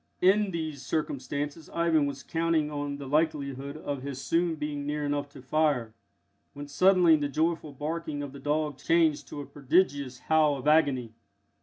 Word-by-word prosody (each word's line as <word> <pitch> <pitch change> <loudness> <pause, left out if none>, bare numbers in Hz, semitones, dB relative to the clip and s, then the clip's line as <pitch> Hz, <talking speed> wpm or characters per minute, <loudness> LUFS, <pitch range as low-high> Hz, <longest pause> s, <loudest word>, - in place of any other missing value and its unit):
In 200 +2 +4
these 155 -5 -4
circumstances 145 +1 -3
Ivan 165 -3 +2
was 140 -1 -6
counting 165 -2 0
on 145 -1 -3
the 140 - -7
likelihood 140 -2 -1
of 145 -3 -4
his 135 -1 -5
soon 165 +3 +1
being 150 -1 -4
near 150 +1 -2
enough 145 0 -2
to 135 - -13
fire, 135 -5 +1 0.6
when 145 0 -8
suddenly 180 +2 +5
the 145 -2 -1
joyful 160 +1 -1
barking 150 +1 -4
of 140 - -6
the 140 - -9
dog 150 0 -1
changed 165 -3 +2
to 145 - -6
a - - -7
prodigious 140 -3 +1
howl 155 -2 +3
of 135 +2 -6
agony. 140 -7 +3
145 Hz, 165 wpm, -28 LUFS, 140-160 Hz, 0.6 s, suddenly